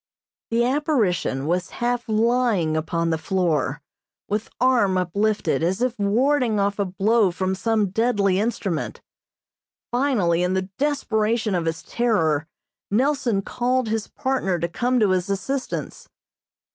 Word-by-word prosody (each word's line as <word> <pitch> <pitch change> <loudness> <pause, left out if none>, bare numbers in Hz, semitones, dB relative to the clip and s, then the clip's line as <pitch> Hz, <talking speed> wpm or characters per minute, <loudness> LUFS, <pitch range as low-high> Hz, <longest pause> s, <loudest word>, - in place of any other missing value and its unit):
The 235 +1 +2
apparition 240 - 0
was 175 +3 -1
half 240 0 -1
lying 220 -7 +2
upon 165 +1 -1
the 160 - 0
floor, 160 -5 0 0.4
with 210 +2 -2
arm 240 -7 +3
uplifted, 200 +4 0
as 180 +5 0
if 245 -2 -1
warding 235 +2 +2
off 200 +1 0
a 200 - +2
blow 200 +3 +2
from 185 +2 -2
some 210 0 0
deadly 205 -3 +2
instrument. 205 -7 -2 0.9
Finally, 235 -10 +1
in 180 +1 +1
the 190 0 -2
desperation 225 -6 0
of 175 -2 0
his 165 0 -3
terror, 165 -11 +1 0.4
Nelson 240 -3 +1
called 250 +1 0
his 220 -1 -2
partner 255 -9 -1
to 170 0 -1
come 245 +8 0
to 210 -4 +3
his 185 +1 0
assistance. 255 +8 -4
205 Hz, 135 wpm, -23 LUFS, 180-240 Hz, 0.9 s, arm